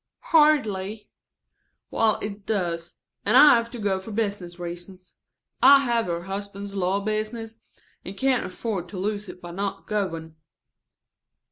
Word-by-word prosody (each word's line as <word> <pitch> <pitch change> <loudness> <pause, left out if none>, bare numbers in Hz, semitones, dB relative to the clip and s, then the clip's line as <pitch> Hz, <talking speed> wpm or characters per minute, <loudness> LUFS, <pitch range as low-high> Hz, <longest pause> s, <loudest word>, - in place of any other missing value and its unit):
"Hardly." 220 -10 +3 0.8
"Well, 220 -2 +2
it 205 -1 -6
does. 170 -5 -2 0.3
And - - +4
I 295 - +9
have 230 0 +1
to 240 - -8
go 200 -3 0
for 190 - -10
business 200 -5 -3
reasons. 175 +1 -9 0.5
I 280 0 +8
have 235 -5 0
her 170 0 -2
husband's 200 +1 -6
law 195 +1 0
business, 220 +2 -5 0.2
and 195 +2 -8
can't 265 -1 +2
afford 185 -1 -4
to 190 - -8
lose 205 +1 -3
it 180 - -10
by 175 - -7
not 195 +3 -4
going." 165 -6 -3
200 Hz, 140 wpm, -25 LUFS, 180-220 Hz, 0.8 s, I